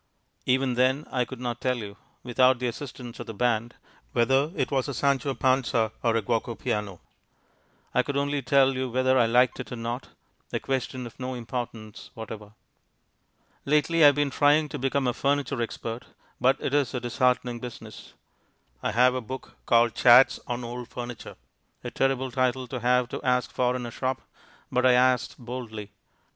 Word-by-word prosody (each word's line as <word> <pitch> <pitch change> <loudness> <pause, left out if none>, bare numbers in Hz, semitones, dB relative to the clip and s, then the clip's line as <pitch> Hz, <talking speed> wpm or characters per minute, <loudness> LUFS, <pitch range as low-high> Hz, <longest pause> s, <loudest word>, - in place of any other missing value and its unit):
Even 130 0 +2
then 130 +4 +2
I 125 -1 +1
could 130 -1 -9
not 120 -1 -4
tell 125 -1 0
you 105 -3 -7 0.3
(without 130 +1 +3
the 125 - -3
assistance 120 -1 -6
of - - -7
the 115 - -7
band) 120 0 0 0.4
whether 135 +6 +2
it - - -1
was 135 -1 0
a 140 - -4
Sancho 140 0 +1
Panza 125 -4 +1
or 115 -2 +2
a 115 - +1
Guoco 115 +1 -1
Piano. 105 -6 -3 0.9
I - - +4
could 140 +2 -3
only 145 0 0
tell 135 +1 +4
you 130 0 -2
whether 130 +1 +2
I 115 - +4
liked 125 +2 +3
it - - -7
or - - -3
not, 120 +2 -5 0.4
a - - -1
question 130 -1 -3
of 120 - -11
no 130 0 -4
importance 115 -3 -6
whatever. 110 -1 -8 1.1
Lately 150 +3 +2
I 150 - +10
have 145 - +5
been 145 -1 0
trying 150 +2 +3
to 145 - -5
become 135 +1 0
a 125 - +1
furniture 140 -2 0
expert, 115 0 -5 0.3
but 130 +2 +3
it 135 - -3
is 140 -4 +1
a - - 0
disheartening 125 0 0
business. 120 -1 -10 0.7
I - - -1
have 125 +2 +5
a 130 - -2
book 130 +3 -8
called 115 -1 +4
Chats 125 +2 +6
on 120 0 -3
Old 120 0 -6
Furniture 120 -1 -7 0.5
a - - -5
terrible 130 -1 0
title 130 0 0
to 125 - -4
have 125 +1 +2
to - - -5
ask 125 -1 +1
for 125 0 +1
in 125 -1 -4
a 120 - -6
shop, 130 +1 -3 0.5
but 125 - +1
I 130 -1 +6
asked 125 0 +2
boldly. 115 -4 -7
125 Hz, 180 wpm, -26 LUFS, 120-130 Hz, 1.1 s, I